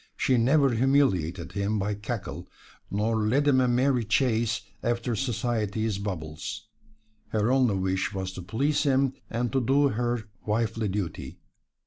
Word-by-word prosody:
She 130 Hz, -, +2 dB
never 135 Hz, +3 st, +4 dB
humiliated 105 Hz, -, +1 dB
him 100 Hz, +1 st, -1 dB
by 105 Hz, +1 st, -1 dB
cackle, 105 Hz, +2 st, -5 dB, 0.4 s
nor 110 Hz, +3 st, 0 dB
led 120 Hz, +7 st, +2 dB
him 130 Hz, -2 st, +5 dB
a 125 Hz, -, +3 dB
merry 125 Hz, 0 st, +2 dB
chase 115 Hz, 0 st, +1 dB, 0.2 s
after 120 Hz, 0 st, -1 dB
society's 110 Hz, -3 st, -1 dB
baubles. 80 Hz, -7 st, -5 dB, 0.6 s
Her 110 Hz, +2 st, +1 dB
only 130 Hz, -6 st, +3 dB
wish 95 Hz, +1 st, 0 dB
was 95 Hz, -2 st, -4 dB
to 95 Hz, -, -7 dB
please 130 Hz, -, 0 dB
him 135 Hz, -2 st, +2 dB, 0.2 s
and 120 Hz, +1 st, -1 dB
to 135 Hz, -, +2 dB
do 140 Hz, +4 st, +3 dB
her 120 Hz, -1 st, -1 dB, 0.2 s
wifely 110 Hz, 0 st, 0 dB
duty. 95 Hz, -3 st, -4 dB
115 Hz, 140 wpm, -27 LUFS, 100-130 Hz, 0.6 s, him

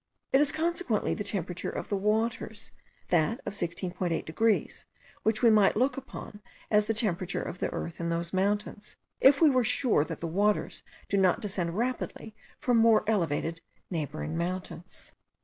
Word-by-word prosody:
It 270 Hz, -, +6 dB
is 295 Hz, -, +4 dB
consequently 330 Hz, -, 0 dB
the 205 Hz, -, -3 dB
temperature 180 Hz, -3 st, -3 dB
of -, -, -5 dB
the 205 Hz, -, 0 dB
waters, 215 Hz, +1 st, -1 dB, 0.4 s
that 175 Hz, -, +2 dB
of -, -, -4 dB
16.8 175 Hz, -1 st, -2 dB
degrees, 220 Hz, +7 st, 0 dB, 0.3 s
which 220 Hz, +2 st, 0 dB
we 230 Hz, -, +7 dB
might 210 Hz, -2 st, +4 dB
look 260 Hz, +4 st, +2 dB
upon 215 Hz, -5 st, -9 dB, 0.3 s
as 210 Hz, -1 st, +4 dB
the 225 Hz, -, 0 dB
temperature 195 Hz, -4 st, 0 dB
of 180 Hz, -, -6 dB
the -, -, -1 dB
earth 170 Hz, -, -5 dB
in 170 Hz, 0 st, -2 dB
those 170 Hz, +1 st, -2 dB
mountains, 205 Hz, +2 st, -1 dB, 0.2 s
if 280 Hz, +3 st, +6 dB
we 310 Hz, -, +8 dB
were 255 Hz, -2 st, +3 dB
sure 225 Hz, -, +2 dB
that -, -, -6 dB
the -, -, -4 dB
waters 200 Hz, +5 st, 0 dB, 0.3 s
do 200 Hz, -, 0 dB
not 190 Hz, +2 st, +3 dB
descend 190 Hz, -5 st, -2 dB
rapidly 240 Hz, -2 st, -3 dB, 0.2 s
from 245 Hz, -2 st, +2 dB
more 225 Hz, -1 st, +5 dB
elevated 165 Hz, -5 st, 0 dB, 0.3 s
neighbouring 155 Hz, -1 st, -3 dB
mountains. 180 Hz, +1 st, -5 dB
205 Hz, 165 wpm, -29 LUFS, 175-225 Hz, 0.4 s, we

